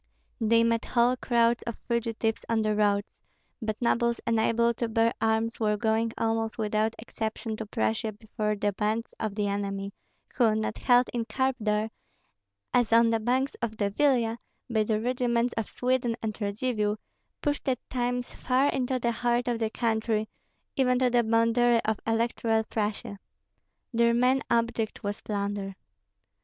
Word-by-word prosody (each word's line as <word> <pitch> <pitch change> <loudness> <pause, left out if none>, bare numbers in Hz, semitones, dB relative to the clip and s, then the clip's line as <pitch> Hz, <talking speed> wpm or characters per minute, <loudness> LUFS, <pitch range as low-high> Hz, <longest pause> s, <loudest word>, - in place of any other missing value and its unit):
They 230 0 +4
met 230 0 +1
whole 245 +1 +3
crowds 235 -2 +2
of 235 - -4
fugitives 230 -1 -1
on 225 -1 +2
the 215 0 +1
roads; 205 -1 0 0.4
but 215 -1 -3
nobles 235 -1 +1
unable 230 +1 +2
to 235 +1 -2
bear 225 +1 +2
arms 225 +1 +1
were 210 -2 +1
going 225 +1 +1
almost 225 0 -1
without 215 0 0
exception 220 -1 -4
to 220 - -6
Prussia 110 - -1
before 210 0 -3
the 205 0 0
bands 215 +3 -2
of 215 -2 -3
the 210 -1 0
enemy, 200 0 -3 0.4
who, 225 -5 +4
not 215 0 -2
held 245 0 +4
in 235 -2 -1
curb 265 +2 0
there, 215 0 0 0.8
as 245 -2 +3
on 230 0 +5
the 225 - +2
banks 255 +5 0
of 220 -2 -3
the 205 -2 0
Vilia, 235 -2 +2 0.3
by 220 -2 +3
the 215 0 0
regiments 240 0 0
of 225 -2 -2
Sweden 250 -2 0
and 215 -1 -1
Radzivill, 210 0 -1 0.5
pushed 290 -2 0
at 255 - +1
times 245 -1 -2
far 260 +3 +2
into 255 0 0
the 235 -1 0
heart 240 +1 0
of 240 -2 0
the 220 -1 0
country, 220 -1 0 0.5
even 250 -2 +3
to 250 -1 +2
the 240 0 +4
boundary 230 +1 +3
of 220 -1 0
Electoral 225 0 +1
Prussia. 210 -2 -3 0.7
Their 235 0 +3
main 255 +2 +3
object 230 -1 0
was 205 +1 -3
plunder. 200 -2 -3
230 Hz, 160 wpm, -28 LUFS, 215-240 Hz, 0.8 s, on